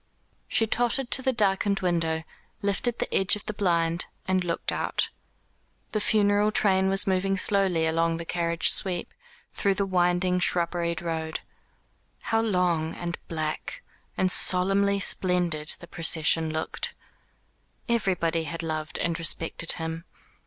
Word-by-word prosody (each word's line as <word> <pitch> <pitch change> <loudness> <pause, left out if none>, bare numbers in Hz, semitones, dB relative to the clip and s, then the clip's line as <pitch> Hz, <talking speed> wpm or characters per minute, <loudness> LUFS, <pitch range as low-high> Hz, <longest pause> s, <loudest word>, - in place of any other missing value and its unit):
She 225 - +2
tottered 240 +3 +2
to 265 - +4
the 260 0 +1
darkened 200 -3 +1
window, 165 -3 0 0.4
lifted 205 +4 0
the - - -3
edge 190 0 +3
of 210 - -10
the 215 - -4
blind, 170 -4 0 0.2
and 185 -1 +1
looked 170 -1 -2
out. - - -1 0.8
The 215 - -1
funeral 205 0 +2
train 190 -3 +2
was 195 0 +4
moving 195 0 0
slowly 190 -4 +2
along 165 +1 +1
the 170 - -6
carriage 170 -1 +1
sweep, 180 -3 -1 0.4
through 195 -1 0
the 200 0 0
winding 180 0 +1
shrubberied 170 -1 0
road. 160 -1 -3 0.8
How 225 0 0
long, 180 -7 0
and 175 0 -5
black, 155 -2 -4 0.3
and 185 -1 +1
solemnly 195 +3 +2
splendid 175 -5 +1
the 170 - -12
procession 160 -1 +2
looked. 160 0 -4 0.9
Everybody 180 -8 0
had 165 +2 -5
loved 155 -1 -3
and 170 0 -1
respected 165 0 +1
him. 165 0 -5
180 Hz, 135 wpm, -26 LUFS, 165-195 Hz, 0.9 s, to